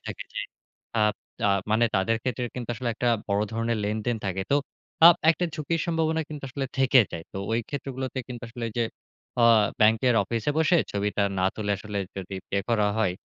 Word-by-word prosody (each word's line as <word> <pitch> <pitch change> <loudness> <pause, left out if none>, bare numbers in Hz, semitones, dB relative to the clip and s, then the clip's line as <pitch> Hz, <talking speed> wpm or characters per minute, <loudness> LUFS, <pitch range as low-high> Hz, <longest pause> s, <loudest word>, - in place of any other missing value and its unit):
থাকে - - -5
যে - - -3 0.6
আব 105 0 +3 0.3
তা - - +2 0.2
মানে 110 +2 +4
তাদের 115 +4 +2
ক্ষেত্রে 125 -1 -2
কিন্তু 125 -2 -5
আসলে 120 +2 -3
একটা 120 +2 0 0.2
বড় 100 +1 +2
ধরণের 115 0 -1
লেনদেন 110 +3 -1
থাকে। 95 0 -1
তো - - +5 0.5
আ - - +13 0.2
একটা 175 +2 0
ঝুঁকির 155 +2 -1
সম্ভাবনা 160 -1 +1
কিন্তু 150 -2 -7
আসলে 135 +2 -3
থেকে 135 -1 +6
যায়। 80 -1 -5
তো - - -7 0.2
ওই 115 - +2
ক্ষেত্রগুলোতে 130 -2 -4
কিন্তু 120 -1 -7
আসলে 120 0 -6
ওই - - -9
যে 120 - +3 0.6
আ - - +5 0.4
ব্যাংকের 110 +3 +4
অফিসে 115 +6 -1
বসে 165 +2 +4 0.2
ছবিটা 100 0 0 0.2
না - - +1
তুলে 105 -1 -3
আসলে 105 0 -5 0.2
যদি 95 0 -6 0.2
পে - - 0
করা 110 -3 +2
হয়। 110 -5 +2
115 Hz, 190 wpm, -26 LUFS, 105-130 Hz, 0.6 s, আ